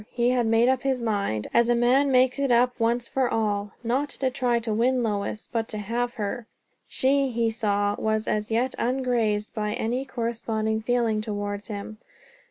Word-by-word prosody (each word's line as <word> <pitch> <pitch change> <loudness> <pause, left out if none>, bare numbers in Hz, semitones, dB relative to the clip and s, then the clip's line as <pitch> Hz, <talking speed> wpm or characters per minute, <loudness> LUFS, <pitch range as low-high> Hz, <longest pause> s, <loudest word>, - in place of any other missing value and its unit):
He 240 0 +1
had 245 -2 +1
made 225 +2 +4
up 260 -1 +2
his 265 -1 0
mind, 200 - -1
as 235 0 +4
a 240 - +4
man 255 +4 +3
makes 255 +1 +3
it 275 -2 +1
up 245 +1 +4
once 235 +1 +1
for 260 -2 0
all; 205 -2 -1
not 260 +5 0
to 260 -2 -2
try 250 -2 +1
to 230 -2 -2
win 245 +3 +2
Lois, 210 -1 -2
but 225 -1 -1
to 215 - -6
have 235 +4 -2
her. 220 +2 -4 0.4
She, 275 +1 +2
he 230 -2 0
saw, 205 -2 0
was 220 0 0
as 210 0 -1
yet 240 +3 0
ungrazed 235 -4 0
by 210 -1 -2
any 245 +4 -1
corresponding 225 -3 -2
feeling 230 -2 +1
towards 205 -1 -4
him. 215 0 -7
230 Hz, 180 wpm, -25 LUFS, 215-250 Hz, 0.4 s, made